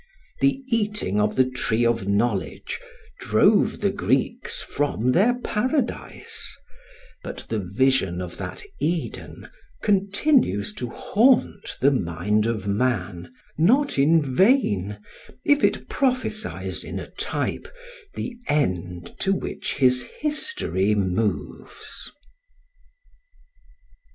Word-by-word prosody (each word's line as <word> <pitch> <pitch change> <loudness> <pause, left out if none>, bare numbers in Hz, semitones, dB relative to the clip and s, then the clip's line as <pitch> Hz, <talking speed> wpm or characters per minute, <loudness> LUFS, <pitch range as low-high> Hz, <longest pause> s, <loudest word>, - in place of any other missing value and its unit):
The 275 -1 +2
eating 210 - 0
of 105 0 +1
the 130 -1 +4
tree 120 -2 0
of 115 -4 +1
knowledge 100 -2 -1 0.4
drove - - +3
the - - +2
Greeks - - -1
from 125 -4 0
their 225 - +3
paradise; 255 +4 -3 0.6
but - - -7
the 110 - -1
vision 100 -1 +1
of 90 -1 -6
that - - -6 0.2
Eden 165 +1 -3 0.4
continues 200 - +2
to 125 +2 -5
haunt 225 - +2
the 140 +3 +5
mind 105 0 0
of 110 -4 -2
man, 100 -5 -1 0.3
not 250 - +3
in 155 +3 +5
vain, 105 - +3 0.5
if 290 0 +4
it - - +1
prophesies 255 -5 -1
in - - -6
a - - -7
type - - -3 0.5
the 245 - -4
end 90 - -1
to 195 - +2
which - - -4
his 125 -2 +3
history 205 - -1
moves. 100 +2 -3
125 Hz, 105 wpm, -24 LUFS, -, 0.6 s, the